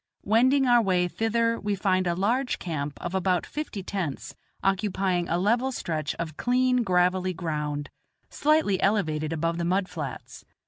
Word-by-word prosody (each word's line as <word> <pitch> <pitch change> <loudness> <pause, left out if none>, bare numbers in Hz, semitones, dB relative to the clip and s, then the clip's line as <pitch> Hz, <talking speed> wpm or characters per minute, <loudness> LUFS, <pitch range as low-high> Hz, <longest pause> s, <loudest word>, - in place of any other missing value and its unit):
Wending 255 +6 +4
our 240 -1 +5
way 180 -4 +2
thither 230 +4 0
we 205 -1 -1
find 185 -1 +1
a 170 - +1
large 240 +8 0
camp 150 -4 -4
of 175 - -5
about 185 -1 +1
fifty 295 -10 -5
tents 180 -8 -4 0.3
occupying 190 -2 0
a 170 - +1
level 235 +8 +1
stretch 155 - -3
of 160 -2 -5
clean 250 +1 +2
gravelly 185 -2 +1
ground, 150 -3 -3 0.4
slightly 295 -11 +2
elevated 155 -7 +1
above 165 +1 -1
the - - -1
mud 185 +2 +1
flats. 150 -8 -7
185 Hz, 150 wpm, -26 LUFS, 170-225 Hz, 0.4 s, our